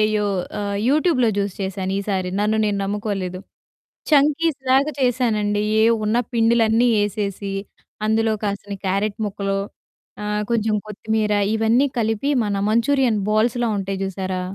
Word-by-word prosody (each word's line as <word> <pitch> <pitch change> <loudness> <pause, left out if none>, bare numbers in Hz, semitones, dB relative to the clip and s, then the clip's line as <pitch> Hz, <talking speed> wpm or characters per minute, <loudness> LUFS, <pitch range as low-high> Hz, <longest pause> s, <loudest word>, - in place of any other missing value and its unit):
You 210 -1 +1 0.3
ఆహ్, 200 0 -2
యూట్యూబ్‌లో 295 -5 +3
జూసి 200 -2 -1
చేశాను 190 0 -3
ఈసారి. 190 -2 -2
నన్ను 215 +1 +1
నేను 205 -1 0
నమ్ముకోలేదు. 195 -3 -3 0.7
చంకీస్‌లాగా 285 -1 +3
చేశానండి. 220 -5 +1 0.2
ఏవున్న 225 0 +2 0.2
పిండిలన్నీ 230 +1 +3 0.2
ఏసేసి 200 -1 -3 0.5
అందులో 220 0 +2
కాసిన్ని 200 0 -3
క్యారట్ 200 +2 0
ముక్కలు, 195 0 -2 0.6
ఆహ్, 210 0 -1
కొంచెం 220 -2 +1
కొత్తిమీర 215 0 -1 0.2
ఇవన్నీ 230 +5 +3
కలిపి 225 +6 0
మన 205 -1 -1
మంచూరియన్ 235 -1 +2
బాల్స్‌లా 230 +2 +1
ఉంటాయి 195 0 -3
చూసారా? 190 -1 -3
215 Hz, 115 wpm, -21 LUFS, 200-235 Hz, 0.7 s, యూట్యూబ్‌లో